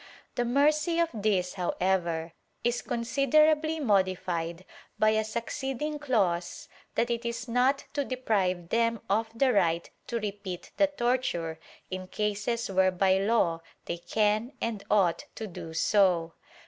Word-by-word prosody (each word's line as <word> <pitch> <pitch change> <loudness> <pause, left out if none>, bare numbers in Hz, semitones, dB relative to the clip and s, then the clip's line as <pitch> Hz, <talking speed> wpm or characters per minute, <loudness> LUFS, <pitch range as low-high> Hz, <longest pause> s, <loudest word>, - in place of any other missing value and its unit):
The 245 - 0
mercy 300 +6 +2
of 335 -1 +3
this, 200 -4 0
however, 175 -3 -1 0.3
is 240 0 +1
considerably 305 +6 +2
modi 195 -8 +3
fied 170 0 -4 0.3
by 215 - +4
a 220 0 +2
succeeding 270 +6 -3
clause 190 -11 0 0.3
that 235 +1 +1
it 235 0 -1
is 235 +1 -4
not 255 +4 +2
to 285 -1 0
deprive 195 -10 -1
them 230 -1 +1
of 220 +2 +1
the 255 +1 +3
right 170 -4 +2 0.2
to 235 - -2
repeat 200 -4 -6
the 295 - +5
torture 240 - -1 0.3
in 185 0 -4
cases 210 +4 -1
where 190 0 +4
by 190 +1 +2
law 195 -6 +2 0.2
they 170 - -4
can 215 +6 0
and 220 -3 -3
ought 190 -5 +2
to 220 - -5
do 165 -4 -8
so. 170 -1 +2
215 Hz, 140 wpm, -28 LUFS, 185-245 Hz, 0.3 s, the